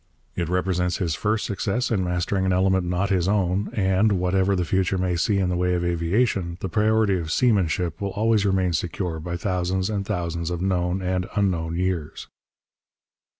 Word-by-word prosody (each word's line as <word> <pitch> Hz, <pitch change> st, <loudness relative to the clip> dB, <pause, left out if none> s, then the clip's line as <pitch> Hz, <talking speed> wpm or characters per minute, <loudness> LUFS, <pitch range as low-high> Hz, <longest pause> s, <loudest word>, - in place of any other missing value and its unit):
It 85 Hz, -2 st, -2 dB
represents 90 Hz, -1 st, 0 dB
his 85 Hz, -4 st, -1 dB
first 105 Hz, +5 st, -1 dB
success 110 Hz, +5 st, -1 dB
in 100 Hz, -4 st, +1 dB
mastering 90 Hz, +2 st, -1 dB
an -, -, +2 dB
element 95 Hz, 0 st, +2 dB
not 90 Hz, +3 st, 0 dB
his 90 Hz, -2 st, +2 dB
own; 100 Hz, -1 st, +1 dB
and, 95 Hz, +1 st, +2 dB
whatever 95 Hz, +1 st, +1 dB
the 90 Hz, -1 st, 0 dB
future 95 Hz, +2 st, +1 dB
may 90 Hz, -1 st, 0 dB
see 100 Hz, +4 st, +1 dB
in 95 Hz, -2 st, +1 dB
the 90 Hz, -, 0 dB
way 90 Hz, 0 st, +1 dB
of 85 Hz, 0 st, -1 dB
aviation, 85 Hz, +1 st, 0 dB
the 95 Hz, -, -4 dB
priority 110 Hz, -1 st, +2 dB
of 80 Hz, -2 st, -5 dB
seamanship 90 Hz, -8 st, +1 dB
will 100 Hz, -, -1 dB
always 110 Hz, +2 st, +1 dB
remain 95 Hz, -3 st, +1 dB
secure 85 Hz, +1 st, -2 dB
by 85 Hz, +2 st, -4 dB
thousands 95 Hz, +1 st, -1 dB
and 100 Hz, -2 st, -1 dB
thousands 85 Hz, -3 st, -3 dB
of 90 Hz, -1 st, -3 dB
known 90 Hz, 0 st, 0 dB
and 90 Hz, 0 st, -1 dB
unknown 85 Hz, -5 st, 0 dB
years. 90 Hz, -4 st, -2 dB
95 Hz, 180 wpm, -24 LUFS, 90-100 Hz, -, an